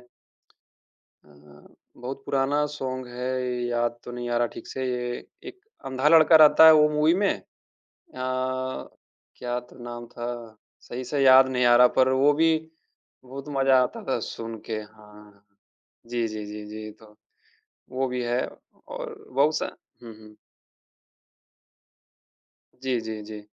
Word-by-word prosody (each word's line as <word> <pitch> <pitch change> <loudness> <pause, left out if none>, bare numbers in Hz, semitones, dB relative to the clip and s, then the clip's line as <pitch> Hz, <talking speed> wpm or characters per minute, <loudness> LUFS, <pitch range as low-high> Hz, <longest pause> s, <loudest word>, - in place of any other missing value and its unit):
अ, - - -21 1.9
बहुत 130 +3 -7
पुराना 140 +2 +1
सॉन्ग 130 -2 -5
है, 125 +1 -4 0.3
याद 120 0 -1
तो 120 - -8
नहीं 120 0 -5
आ 120 - 0
रहा 120 - +2
ठीक - - -9
से। 130 - -5 0.7
एक 380 0 -12 0.3
अंधा 130 +2 +1
लड़का 160 0 +7
रहता 155 0 +8
है 160 - +10
वो 150 0 +5
मूवी 155 +2 +3
में 200 +1 +2
अ, - - -21 0.7
क्या 130 -1 -5
तो 125 +1 -18
नाम 120 0 -7
था? 120 -2 -7 0.2
सही 125 +2 -7
से 140 +2 -2
याद 130 0 +7
नहीं 125 -1 +1
आ 120 0 +6
रहा 125 +1 +7
पर 130 0 +5
वो 135 +3 +4
भी 160 +2 +3 0.7
बहुत 135 +2 -9
मज़ा 135 -1 +4
आता 125 - -5
था - - +1
सुन 115 0 -7
के, 115 - -5
हाँ। 105 -1 -17 0.6
जी, 120 -1 -1
जी, 110 -1 -6
जी, 105 0 -8
जी। 110 0 -8
तो, 105 0 -20 0.7
वो 130 +1 -1
भी 125 0 -3
है 120 +1 0 0.5
और - - -7 0.2
बहुत-सा 145 +4 +1 0.3
हुँ, 115 -1 -9
हुँ। 110 -1 -16 2.5
जी, 130 -3 0
जी, 110 -1 -6
जी। 105 -1 -10
125 Hz, 140 wpm, -25 LUFS, 115-135 Hz, 2.5 s, है